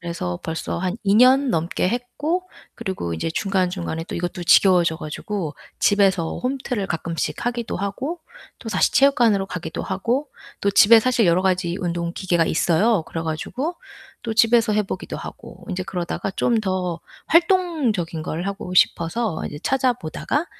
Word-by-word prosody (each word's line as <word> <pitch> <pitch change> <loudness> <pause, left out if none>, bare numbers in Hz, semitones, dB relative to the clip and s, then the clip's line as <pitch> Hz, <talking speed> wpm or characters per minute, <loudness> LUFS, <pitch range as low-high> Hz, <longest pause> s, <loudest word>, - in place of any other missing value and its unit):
그래서 170 - -4
벌써 160 +1 -3
한 185 +3 -2
2 200 0 +3
년 260 +2 +5
넘게 170 +1 0
했고 290 - -2 0.3
그리고 190 - -4
이제 120 - -3
중간중간에 180 -3 -1
또 - - -7
이것도 175 0 -4
지겨워져 175 -3 +5
가지고 155 +1 -5 0.2
집에서 195 -5 +2
홈트를 250 -5 -2
가끔씩 165 +2 -3
하기도 240 -1 -2
하고 260 - -4 0.4
또다시 225 -3 +1
체육관으로 235 -8 +4
가기도 175 -3 -5
하고 245 +9 -1 0.3
또 200 - +2
집에 225 +3 +7
사실 240 -3 +2
여러 175 +2 +3
가지 180 -2 0
운동 170 -1 -2
기계가 175 -3 +1
있어요. 175 +5 +2
그래 165 - -4
가지고 250 - -3 0.5
또 225 -2 -3
집에서 230 -1 +4
해 210 -1 +1
보기도 - - -5
하고 - - -10
인제 185 -2 -3
그러다가 180 +1 -3
좀 230 +3 +1
더 185 -4 -2 0.3
활동적인 305 - +1
걸 165 +3 -4
하고 195 -2 -5
싶어서 180 +2 +1
이제 145 - -8
찾아 260 -1 +2
보다가 255 - -3
195 Hz, 340 characters per minute, -22 LUFS, 170-240 Hz, 0.5 s, 집에